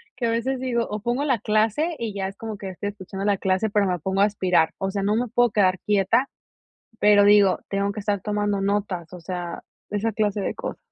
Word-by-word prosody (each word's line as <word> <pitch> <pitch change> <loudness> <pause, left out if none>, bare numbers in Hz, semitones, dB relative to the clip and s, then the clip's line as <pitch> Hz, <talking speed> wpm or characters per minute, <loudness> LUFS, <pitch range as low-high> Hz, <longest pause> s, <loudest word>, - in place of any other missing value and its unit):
que 245 -2 -1
a - - +1
veces 250 +3 -1
digo, 240 -2 0
o 210 0 -4
pongo 245 +5 -1
la 260 -6 +1
clase, 220 - +1
y 225 -3 -3
ya 195 -1 -2
es 195 - -9
como 220 -2 -6
que 195 - -5
estoy 190 +2 -4
escuchando 195 -1 -7
la 205 -1 +2
clase, 190 +3 0
pero, 205 -1 +2
me 180 -1 0
pongo 190 +4 -1
a - - +7
aspirar. 180 -5 +2
O 195 0 -2
sea, 200 0 -2
no 205 +2 +2
me 245 +2 0
puedo 245 +1 +3
quedar 185 -3 +2
quieta, 210 +7 +2 0.7
pero 205 -1 +6
digo, 205 -2 +5
tengo 200 0 0
que 210 - -6
estar 205 -1 -1
tomando 205 0 -1
notas, 195 -4 -2
o 180 - -9
sea, 175 0 -5 0.3
esa 210 +2 -1
clase 210 -1 0
de - - -2
cosas. - - -6
205 Hz, 230 wpm, -24 LUFS, 195-225 Hz, 0.7 s, a